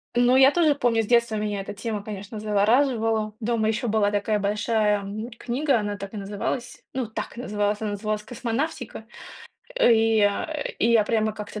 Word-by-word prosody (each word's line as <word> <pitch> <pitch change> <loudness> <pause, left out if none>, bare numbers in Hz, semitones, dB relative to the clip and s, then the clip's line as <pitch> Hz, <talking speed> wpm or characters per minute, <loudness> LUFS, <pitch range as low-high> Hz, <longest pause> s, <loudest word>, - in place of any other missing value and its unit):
Ну 245 +1 +4
я 265 +1 +8
тоже 310 -2 +3
помню 240 -5 +1
с - - -4
детства 235 -1 +2
меня 210 -1 -2
эта 195 - -7
тема, 215 0 -4
конечно, 205 +1 -7
завораживала. 220 +1 +1
Дома 230 -1 0
ещё 220 +2 -1
была 210 -1 +2
такая 205 +1 0
большая, 210 +1 +1
м, 210 +4 -6
книга, 265 +1 0
она 205 -1 -3
так 200 +2 -8
и - - -4
называлась, 205 +5 -4
ну 260 -2 -1
так 220 +1 -6
называлась, 210 -3 -1
она 215 -1 -2
называлась 210 +1 -3
"Космонавтика". 245 +1 -4 0.7
И, 225 - +4
э, 290 +10 -1
и 230 - +2
я 225 -2 +5
прямо 215 0 +1
как-то 210 0 -7
220 Hz, 175 wpm, -24 LUFS, 210-240 Hz, 0.7 s, я